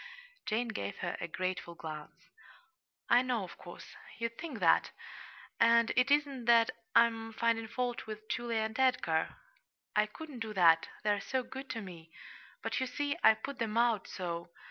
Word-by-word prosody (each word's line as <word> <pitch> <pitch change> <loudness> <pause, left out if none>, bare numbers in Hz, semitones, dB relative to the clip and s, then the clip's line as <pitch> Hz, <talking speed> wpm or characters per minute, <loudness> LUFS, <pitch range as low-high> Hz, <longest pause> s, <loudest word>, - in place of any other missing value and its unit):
Jane 230 +2 0
gave 100 - -4
her - - -2
a - - -2
grateful 185 0 -3
glance. 160 +2 -9 0.8
"I 240 +1 +6
know, 250 -4 -1
of 180 - -9
course, 175 - -11 0.2
you'd 230 0 -3
think 315 -5 -6
that, 170 -3 +4 0.7
and 230 0 +5
it 255 +1 +4
isn't 280 -4 +1
that 230 -1 +5 0.2
I'm 225 -1 +3
finding 230 0 +1
fault 245 0 -3
with 215 0 -7
Julia 235 -1 -1
and 220 +2 -3
Edgar. 250 -12 +2 0.6
I 210 0 +4
couldn't 290 +3 -9
do 220 -2 -5
that 165 -3 +5 0.2
they're 205 -1 +1
so 260 +4 -1
good 265 +2 -8
to 230 -3 -3
me. 170 -4 -11 0.5
But, - - -1
you 260 - -1
see, 290 +3 -2
I 220 - +8
put 265 +4 -7
them 225 -1 -1
out 235 -4 +2
so. 170 -2 -5
225 Hz, 165 wpm, -32 LUFS, 185-245 Hz, 0.8 s, I